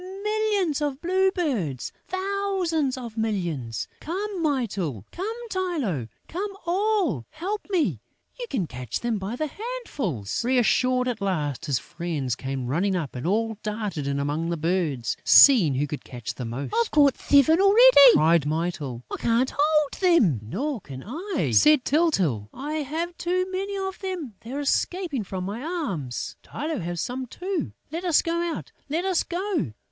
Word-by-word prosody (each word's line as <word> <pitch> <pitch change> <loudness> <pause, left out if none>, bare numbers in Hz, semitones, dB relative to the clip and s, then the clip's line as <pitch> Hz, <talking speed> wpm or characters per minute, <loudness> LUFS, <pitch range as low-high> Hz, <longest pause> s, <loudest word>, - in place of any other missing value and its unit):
Millions 420 -8 +1
of 285 -2 -1
blue 375 +3 +2
birds!... 235 - -2 0.2
Thousands 375 -7 -1
of 235 -4 -7
millions!... 170 - -2
Come, 385 +3 -4
Mytyl!... 200 - -1
Come, 450 +6 -5
Tylô!... 290 - -1 0.2
Come, 395 +3 -4
all!... 355 - +1
Help 400 +6 -4
me!... 295 - +1 0.4
You 485 - -4
can 230 - -1
catch 125 -5 -5
them 235 -3 -1
by 195 +5 -4
handfuls!..." 290 - -3
Reassured 255 +1 +2
at 235 -4 -2
last, 165 -6 -2
his 140 -3 +2
friends 145 -3 -3
came 135 -1 -4
running 180 +10 0
up 160 -8 -3
and 125 +6 -3
all 225 +2 0
darted 210 -9 -3
in 140 0 -1
among 150 +4 -1
the 170 - -1
birds, 160 -7 -1
seeing 210 - +7
who 140 +3 +1
could 145 0 -6
catch 120 -4 -6
the 125 - -6
most: 125 +3 -5
"I've 235 - +2
caught 285 -3 +4
seven 305 +5 +4
already!" 400 - +8
cried 160 -1 +4
Mytyl. 150 -6 -2
"I - - -2
can't 235 +3 +1
hold 300 0 +3
them!" 290 - +4
"Nor 235 - -3
can 135 -4 -9
I!" 305 - -2
said 300 - +5
Tyltyl. 190 - +1
"I 295 +4 -4
have 320 +4 -3
too 365 +1 0
many 395 +2 -3
of 385 -1 -4
them!... 360 - -4
They're 265 +6 -5
escaping 310 - 0
from 190 -1 -5
my 205 +5 -4
arms!... 260 - -4
Tylô 300 - -4
has 175 0 -4
some 255 +1 -4
too!... 365 +3 -3 0.2
Let 335 +3 -4
us 345 -4 +3
go 335 - -2
out, 340 -3 -4 0.2
let 330 +5 -1
us 375 -3 +2
go!... 355 - -2
255 Hz, 160 wpm, -25 LUFS, -, 0.4 s, already